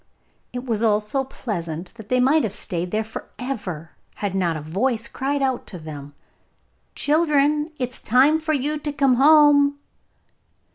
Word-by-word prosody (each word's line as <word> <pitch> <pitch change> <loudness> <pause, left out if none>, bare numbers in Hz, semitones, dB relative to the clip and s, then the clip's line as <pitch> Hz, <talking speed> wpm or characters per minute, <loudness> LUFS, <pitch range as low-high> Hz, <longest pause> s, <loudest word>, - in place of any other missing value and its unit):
It 250 +1 -6
was 225 -4 -1
all 215 -2 +3
so 215 +6 +1
pleasant 175 -10 -6
that 220 -3 -13
they 255 - +2
might 275 +5 +4
have 210 -3 -2
stayed 180 -2 -3
there 215 +3 -1
for 220 - -9
ever 185 - -5 0.2
had 200 -2 -3
not 175 -4 0
a - - -6
voice 225 - -1
cried 280 +1 -2
out 260 -2 -1
to 185 - -7
them, 145 -3 -9 0.8
'Children, 300 0 +2
it 250 -3 -2
is 250 - -3
time 270 +7 +4
for 315 0 -1
you 295 +2 -1
to 295 0 -3
come 275 -2 +2
home! 285 0 +5
250 Hz, 165 wpm, -22 LUFS, 195-285 Hz, 0.8 s, home